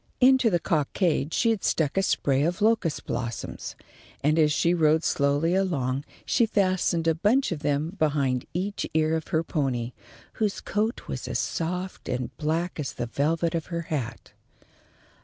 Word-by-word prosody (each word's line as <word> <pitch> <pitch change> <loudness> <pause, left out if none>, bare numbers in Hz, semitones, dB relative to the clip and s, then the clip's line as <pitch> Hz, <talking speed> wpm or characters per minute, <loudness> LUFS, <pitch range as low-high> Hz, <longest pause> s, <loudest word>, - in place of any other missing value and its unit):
Into 260 -2 +5
the 175 -4 +2
cockade 160 -1 0
she 230 +5 +2
had 220 -4 -2
stuck 150 -4 +1
a 195 - +3
spray 140 -7 +1
of 170 +5 0
locust 215 -7 +1
blossoms, 120 -1 -4 0.5
and 155 +3 +3
as 150 -1 +4
she 170 +3 +2
rode 160 -1 +3
slowly 145 +4 +2
along 145 -8 0 0.2
she 235 -2 +3
fastened 185 -5 +1
a 165 - +4
bunch 210 - +2
of 165 - -2
them 150 +5 -1
behind 140 -5 +1
each 195 +4 -2
ear 160 0 +3
of 160 - -3
her 160 +1 +1
pony, 130 -7 -1 0.5
whose 210 -2 +1
coat 220 +4 -2
was - - -5
as - - -1
soft 180 +3 -3
and 125 0 -3
black 165 +3 -1
as 140 - -3
the 120 - -3
velvet 160 +7 0
of 165 -2 -2
her 170 -1 -3
hat. 125 -6 -4
160 Hz, 165 wpm, -26 LUFS, 145-185 Hz, 0.5 s, Into